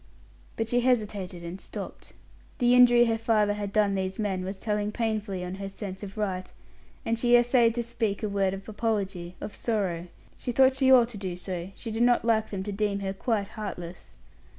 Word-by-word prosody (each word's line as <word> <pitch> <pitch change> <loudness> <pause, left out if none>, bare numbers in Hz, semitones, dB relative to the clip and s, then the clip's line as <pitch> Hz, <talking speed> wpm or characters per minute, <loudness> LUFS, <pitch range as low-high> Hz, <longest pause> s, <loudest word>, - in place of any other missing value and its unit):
But 225 - -2
she 245 +2 +2
hesitated 210 -8 0
and 170 +3 -7
stopped. - - -8 0.4
The 245 -2 +4
injury 245 -1 +7
her 225 -1 0
father 215 -2 +2
had 205 -1 -4
done 205 -1 +2
these 190 -1 -2
men 195 -4 -1
was 190 +1 -5
telling 210 0 -1
painfully 215 -5 -2
on 180 - -5
her 195 - -4
sense 195 -1 -7
of 200 0 -8
right, 185 -3 -2 0.5
and 230 0 0
she 240 0 +5
essayed 240 -1 +4
to 240 - -1
speak 225 -3 -2
a - - +1
word 195 -1 0
of 195 0 -10
apology, 200 -5 -2
of 205 - -6
sorrow; 185 -7 -1 0.3
she 245 - -4
thought 260 +2 +5
she 265 -1 +4
ought 245 -3 +7
to 215 -4 -8
do 185 -3 -4
so; 180 0 -5
she 230 - -6
did 225 +1 -2
not 240 -1 +4
like 220 -2 +2
them 190 -2 -4
to 205 - -4
deem 200 0 -1
her 195 -1 -2
quite 205 0 -1
heartless. 180 -5 -7
210 Hz, 200 wpm, -27 LUFS, 190-230 Hz, 0.5 s, injury